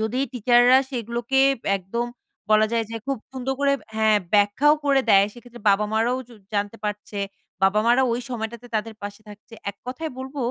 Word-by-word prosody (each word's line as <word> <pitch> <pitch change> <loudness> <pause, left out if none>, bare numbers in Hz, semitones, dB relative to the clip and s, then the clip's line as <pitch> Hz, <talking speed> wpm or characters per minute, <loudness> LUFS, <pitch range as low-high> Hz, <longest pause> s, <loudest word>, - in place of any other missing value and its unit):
যদি 220 +3 -1
টিচাররা 245 +1 +5
সেগুলোকে 240 +2 -1 0.4
একদম 195 +6 -3 0.4
বলা 215 0 +5
যায় 230 -1 +1
যে 230 - -4
খুব 275 -1 0 0.2
সুন্দর 265 0 -3
করে 280 0 +3 0.2
হ্যাঁ 220 -1 +4 0.2
ব্যাখ্যাও 205 +9 +4
করে 280 -1 +4
দেয় 200 0 +6
সেক্ষেত্রে 240 0 -14
বাবা 200 +2 +3
মা 220 - +2
রাও 250 +2 0
জ - - -20 0.2
জানতে 205 +2 -1
পারছে 210 0 -4 0.4
বাবা 195 +2 +4
মা 235 - +6
রাও 265 0 +3
ওই 240 - -2
সময়টাতে 235 0 -5
তাদের 220 +1 -3
পাশে 205 +1 -7
থাকছে 210 +2 -13 0.2
এক 200 - -21
কথাই 310 +6 -4
বলব 265 +2 -7
235 Hz, 185 wpm, -23 LUFS, 210-255 Hz, 0.4 s, দেয়